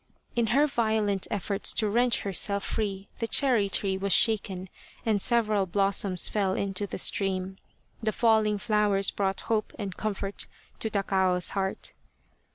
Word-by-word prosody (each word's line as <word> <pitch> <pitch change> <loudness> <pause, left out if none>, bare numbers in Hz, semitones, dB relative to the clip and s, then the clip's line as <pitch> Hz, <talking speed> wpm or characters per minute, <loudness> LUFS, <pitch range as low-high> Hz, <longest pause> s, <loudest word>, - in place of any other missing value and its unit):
In 235 -1 +1
her 275 +7 +3
violent 220 -7 0
efforts 200 -1 0
to 215 - +3
wrench 240 +3 +2
herself 200 +1 0
free 200 -3 -3
the 230 - -1
cherry 235 -7 +3
tree 195 -1 0
was 200 0 -2
shaken 195 -4 +3 0.4
and 215 -3 +1
several 215 -5 +2
blossoms 195 -1 +2
fell 195 -3 0
into 200 0 -2
the - - -5
stream. 190 0 -1 0.4
The 220 -1 0
falling 220 -1 +2
flowers 205 -1 +1
brought 195 -1 -2
hope 220 -2 -2
and 200 -4 -5
comfort 200 -2 -3 0.3
to 220 - -2
Takao's 190 -3 +1
heart. 195 -1 -3
200 Hz, 145 wpm, -27 LUFS, 195-220 Hz, 0.4 s, her